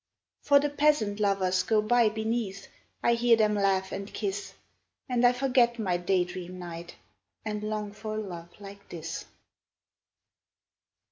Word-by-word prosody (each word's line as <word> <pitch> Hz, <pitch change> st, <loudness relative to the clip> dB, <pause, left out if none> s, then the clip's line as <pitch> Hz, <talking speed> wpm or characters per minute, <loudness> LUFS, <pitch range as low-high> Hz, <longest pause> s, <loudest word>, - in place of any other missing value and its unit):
For 285 Hz, -1 st, +5 dB
the 290 Hz, 0 st, -1 dB
peasant 290 Hz, -9 st, +2 dB
lovers 190 Hz, -3 st, +2 dB
go 215 Hz, +4 st, +2 dB
by 230 Hz, +1 st, +4 dB
beneath, 220 Hz, -2 st, -3 dB, 0.4 s
I 235 Hz, -, +4 dB
hear 235 Hz, 0 st, +4 dB
them 215 Hz, -1 st, +3 dB
laugh 195 Hz, -2 st, +1 dB
and 200 Hz, +1 st, -5 dB
kiss, 200 Hz, -1 st, -4 dB, 0.5 s
And 245 Hz, -1 st, 0 dB
I 245 Hz, -, +7 dB
forget 250 Hz, -2 st, +2 dB
my 190 Hz, -6 st, 0 dB
day 180 Hz, +1 st, +2 dB
dream 180 Hz, 0 st, -7 dB
knight, 170 Hz, -1 st, -8 dB, 0.5 s
And 210 Hz, -1 st, -3 dB
long 210 Hz, -1 st, -3 dB
for 215 Hz, +1 st, -6 dB
a -, -, -1 dB
love 175 Hz, -5 st, -7 dB
like 200 Hz, 0 st, -12 dB
this. 165 Hz, -1 st, -6 dB
210 Hz, 145 wpm, -28 LUFS, 190-230 Hz, 0.5 s, I